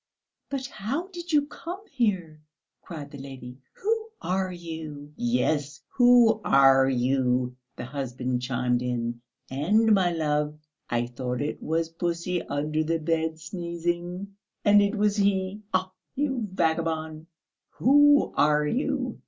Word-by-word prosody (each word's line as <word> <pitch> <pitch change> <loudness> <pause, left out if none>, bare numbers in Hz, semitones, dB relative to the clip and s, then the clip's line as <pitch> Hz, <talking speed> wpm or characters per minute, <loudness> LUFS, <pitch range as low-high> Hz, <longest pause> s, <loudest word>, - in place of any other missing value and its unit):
"But 275 -2 -3
how 265 - -4
did 350 -2 -7
you 295 -2 +4
come 350 +6 -8
here?" 190 - -1 0.4
cried 150 -5 -8
the 140 - -9
lady. 130 -2 -9
"Who 445 +2 -1
are 185 0 -1
you?" 160 -4 -8
"Yes, 155 - 0
who 245 -3 +5
are 135 -1 +5
you?" 125 -1 +1 0.2
the - - -6
husband 125 -2 -3
chimed 125 -1 0
in. 120 -1 -2 0.3
"And, 210 +11 +3
my 185 -3 +3
love, 150 -2 -1 0.3
I 120 0 0
thought 125 +1 -4
it 145 +2 -3
was 165 +1 -1
pussy 170 +1 -2
under 150 +2 -1
the 165 +1 0
bed 160 0 -1
sneezing. 175 +2 -4 0.3
And 205 0 +7
it 200 +2 +1
was 210 0 +1
he. 200 0 +1
Ah, 185 0 0 0.2
you 265 -5 -1
vagabond! 160 -2 -1 0.5
Who 290 +2 +5
are 150 0 +3
you? 255 - -1
165 Hz, 130 wpm, -26 LUFS, 145-210 Hz, 0.5 s, And